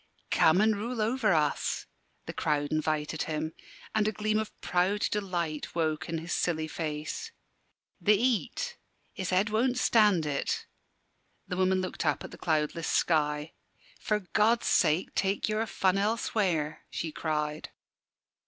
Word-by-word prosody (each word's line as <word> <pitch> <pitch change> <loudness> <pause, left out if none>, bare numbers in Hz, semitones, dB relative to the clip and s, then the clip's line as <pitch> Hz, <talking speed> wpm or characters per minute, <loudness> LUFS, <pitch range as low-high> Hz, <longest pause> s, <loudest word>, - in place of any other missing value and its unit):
"Come 160 +5 +5
an' 220 +1 +4
rule 230 +4 -3
over 220 0 +2
us," 150 -4 +1 0.4
the - - -6
crowd 145 -1 0
invited 155 0 -1
him, 155 0 -2 0.4
and 215 -1 +2
a - - +2
gleam 215 +1 0
of 220 - -5
proud 185 +4 +1
delight 175 -8 -2
woke 160 -1 -1
in 165 - -1
his 165 +2 -4
silly 160 -3 0
face. 155 - -4 0.7
"The 210 -1 +5
heat 260 - -1 0.3
his 190 -2 -4
head 195 +3 +2
won't 245 +3 +2
stand 210 -9 +4
it." 145 -2 -1 0.8
The 180 - -3
woman 185 0 +3
looked 185 - -3
up - - +1
at - - -8
the - - -11
cloudless 160 0 0
sky. 150 -1 +1 0.5
"For 210 -1 0
God's 215 +5 +2
sake 155 +5 +2
take 195 +1 0
your 215 +1 0
fun 190 -1 +1
elsewhere!" 195 -7 0
she 160 - -3
cried. 150 -1 -2
185 Hz, 145 wpm, -29 LUFS, 155-215 Hz, 0.8 s, Come